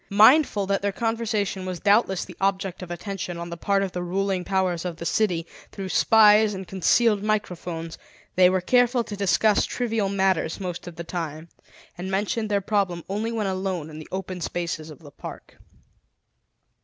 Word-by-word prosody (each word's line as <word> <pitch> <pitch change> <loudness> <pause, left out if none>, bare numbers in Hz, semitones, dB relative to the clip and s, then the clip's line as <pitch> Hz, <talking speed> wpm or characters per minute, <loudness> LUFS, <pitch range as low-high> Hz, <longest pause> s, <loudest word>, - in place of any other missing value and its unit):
Mindful 215 +1 +5
that 195 0 0
their 200 0 0
conversation 215 -3 -1
was 185 -2 -4
doubtless 200 -2 +2
the 180 - -11
object 195 -1 -1
of 180 - -7
attention 175 0 -5
on 170 0 -6
the - - -4
part 195 +3 +1
of 190 - -3
the 180 - -4
ruling 190 +1 -1
powers 185 -3 0
of 175 -2 -4
the 170 - -7
city 175 -5 +1 0.3
through 195 -2 -6
spies 210 0 +5
and 190 -1 -7
concealed 205 +3 +3
microphones, 180 -6 -3 0.4
they 180 0 +6
were 185 0 +1
careful 245 +4 +3
to 210 - -7
discuss 200 +2 +3
trivial 225 -5 -1
matters 190 -4 0
most 180 -2 -5
of 175 - -8
the 170 - -6
time, 165 -2 -5 0.5
and 185 +2 -4
mentioned 210 +3 -1
their 200 -1 +1
problem 190 -4 0
only 210 +4 -2
when 225 -2 -1
alone 185 -4 -3
in 155 - -9
the 155 - -11
open 185 -1 -5
spaces 170 -2 -3
of 150 - -10
the 145 - -12
park. - - -10
190 Hz, 180 wpm, -25 LUFS, 175-210 Hz, 0.5 s, they